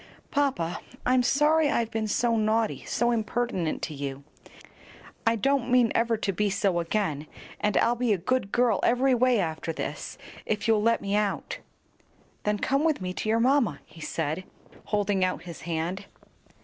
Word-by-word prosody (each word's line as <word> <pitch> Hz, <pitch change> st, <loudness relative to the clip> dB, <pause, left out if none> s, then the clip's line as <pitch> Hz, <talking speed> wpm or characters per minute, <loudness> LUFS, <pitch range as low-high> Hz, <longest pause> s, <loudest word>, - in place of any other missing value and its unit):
"Papa, 265 Hz, -13 st, 0 dB, 0.2 s
I'm 255 Hz, 0 st, +4 dB
sorry 295 Hz, +4 st, +3 dB
I've 235 Hz, -5 st, 0 dB
been 220 Hz, -1 st, -1 dB
so 230 Hz, +2 st, +1 dB
naughty, 220 Hz, 0 st, +1 dB
so 240 Hz, 0 st, +1 dB
impertinent 225 Hz, -6 st, -1 dB
to 155 Hz, -, -3 dB
you. 140 Hz, -1 st, -5 dB, 1.0 s
I 230 Hz, -, +4 dB
don't 265 Hz, +2 st, +1 dB
mean 245 Hz, -2 st, +4 dB
ever 230 Hz, 0 st, +2 dB
to 200 Hz, -2 st, -1 dB
be 210 Hz, +3 st, +1 dB
so 195 Hz, -2 st, +1 dB
again; 165 Hz, -4 st, -1 dB, 0.3 s
and 210 Hz, -2 st, +1 dB
I'll 235 Hz, -, +4 dB
be 240 Hz, -1 st, 0 dB
a 205 Hz, -, +3 dB
good 200 Hz, +2 st, -1 dB
girl 240 Hz, -4 st, +2 dB
every 255 Hz, +2 st, +3 dB
way 250 Hz, -1 st, +3 dB
after 165 Hz, -2 st, -2 dB
this, 160 Hz, -, -5 dB, 0.3 s
if 210 Hz, 0 st, -2 dB
you'll 220 Hz, -2 st, +4 dB
let 230 Hz, +2 st, +2 dB
me 200 Hz, 0 st, 0 dB
out." 210 Hz, -1 st, -1 dB, 0.9 s
"Then 210 Hz, 0 st, +1 dB
come 275 Hz, +7 st, +1 dB
with 320 Hz, -2 st, +2 dB
me 180 Hz, -1 st, -4 dB
to 215 Hz, -, -3 dB
your 225 Hz, +1 st, +3 dB
mamma," 245 Hz, -, +2 dB
he 165 Hz, -, -15 dB
said, 160 Hz, +3 st, -2 dB, 0.4 s
holding 205 Hz, -2 st, +1 dB
out 185 Hz, -1 st, -1 dB
his 170 Hz, -2 st, -9 dB
hand. 170 Hz, +4 st, -2 dB
215 Hz, 170 wpm, -27 LUFS, 185-245 Hz, 1.0 s, I'm